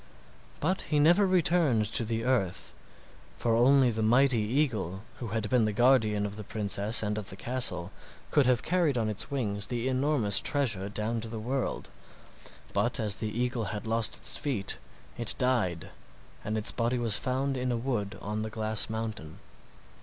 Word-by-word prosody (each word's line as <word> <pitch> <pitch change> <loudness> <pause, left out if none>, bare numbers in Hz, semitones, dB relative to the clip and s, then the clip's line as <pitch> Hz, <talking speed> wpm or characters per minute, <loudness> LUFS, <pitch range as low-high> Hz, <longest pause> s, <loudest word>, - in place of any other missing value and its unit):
But 185 +5 0
he 150 - +1
never 175 +7 +5
returned 165 -10 +3
to - - +2
the 115 0 -2
earth, 95 - -1 0.6
for 115 -1 +1
only 130 +1 +5
the 110 0 -2
mighty 125 +2 +4
eagle, 105 - -1 0.2
who 120 - -5
had 110 0 -2
been 120 -1 +2
the 110 - 0
guardian 110 -3 +3
of 105 +1 -5
the 105 - -6
princess 105 +1 +1
and 105 0 -1
of 105 -1 -6
the - - -6
castle, 105 -8 -3 0.4
could 145 -4 +3
have 125 -2 +2
carried 170 -6 +1
on 110 -2 0
his 110 +2 -5
wings 105 -7 -1
the 120 0 -2
enormous 130 -6 +2
treasure 105 -9 -1
down 110 +2 -2
to 115 - -5
the 110 0 -6
world. 125 +4 -3 0.8
But - - +1
as 105 -4 +3
the 110 - -3
eagle 120 0 -2
had 105 +2 -5
lost 115 -1 0
its - - -1
feet, 100 - -1 0.4
it 120 - 0
died, 115 - 0 0.5
and 110 +1 -2
its 110 - +3
body 120 +1 -1
was 115 -3 +1
found 135 +2 -1
in 125 0 -1
a 120 - 0
wood 115 -5 -3
on 105 +1 -3
the 110 - -3
glass 110 0 0
mountain. 110 -8 -5
115 Hz, 175 wpm, -29 LUFS, 105-130 Hz, 0.8 s, never